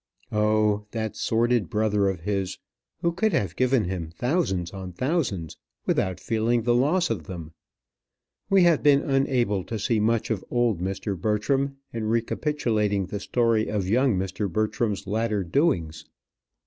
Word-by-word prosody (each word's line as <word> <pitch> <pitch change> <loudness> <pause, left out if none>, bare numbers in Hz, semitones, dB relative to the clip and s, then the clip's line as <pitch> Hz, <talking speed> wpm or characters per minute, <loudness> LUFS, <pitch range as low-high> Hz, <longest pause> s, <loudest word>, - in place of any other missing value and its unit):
Oh, 105 -1 +2
that 110 -2 -3
sordid 115 -4 +1
brother 105 -2 +1
of 95 -3 -4
his, 95 0 -2 0.5
who 170 - +3
could 215 +5 0
have 90 -4 0
given 130 -2 +2
him 90 -3 -4
thousands 95 - -1
on 95 -2 -7
thousands 125 - -1 0.3
without 95 -1 0
feeling 115 +1 0
the 120 +1 +3
loss 145 +6 +2
of 90 -9 -3
them! 85 -4 -7 1.0
We 195 -2 +5
have 170 -3 +4
been 140 -1 +5
unable 130 -8 +1
to 115 - -4
see 110 +2 +1
much 115 +2 +1
of 105 -4 -1
old 120 -6 +1
Mr. 95 +2 -2
Bertram 135 +8 0 0.2
in 115 -2 -3
recapitulating 110 -3 0
the 100 - -5
story 115 0 +1
of 100 -3 -1
young 120 +1 +3
Mr. 95 +1 -2
Bertram's 110 +1 -1
latter 105 0 0
doings. 85 - 0
110 Hz, 150 wpm, -25 LUFS, 95-125 Hz, 1.0 s, We